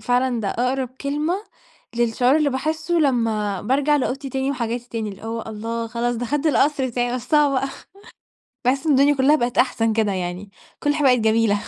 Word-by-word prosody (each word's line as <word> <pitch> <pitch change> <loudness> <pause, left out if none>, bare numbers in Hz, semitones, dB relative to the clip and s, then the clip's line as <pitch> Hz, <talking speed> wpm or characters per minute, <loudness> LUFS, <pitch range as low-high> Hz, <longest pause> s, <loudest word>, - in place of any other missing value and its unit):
فعلًا 245 +1 +1
ده 200 - -2
أقرب 255 +3 -1
كلمة 295 +5 -1 0.6
للشعور 240 +3 +2
اللي 300 -2 +2
باحسه 315 +5 -2
لما 225 - +1
بارجع 285 +6 +2
لأوضتي 270 0 -2
تاني 265 +1 -1
وحاجاتي 240 -2 -3
تاني، 225 -2 -3
اللي 195 -1 -10
هو 225 0 -4
الله! 230 +2 -4
خلاص 235 +1 -2
دخلت 280 +6 -1
القصر 290 -2 +2
بتاعي، 245 0 -1
وسّعوا 290 +3 +2
بقى 270 +1 -2 1.0
باحس 270 +5 +1
إن 305 - +4
الدنيا 280 +2 +4
كُلها 275 +2 +4
بقت 240 -4 -2
أحسن 225 -3 +2
كده 215 -2 +1
يعني، 185 +2 -4 0.3
كل 290 0 +2
حاجة 295 -2 +1
بقت 250 -1 +5
جميلة 220 -1 +2
250 Hz, 175 wpm, -22 LUFS, 225-280 Hz, 1.0 s, بقت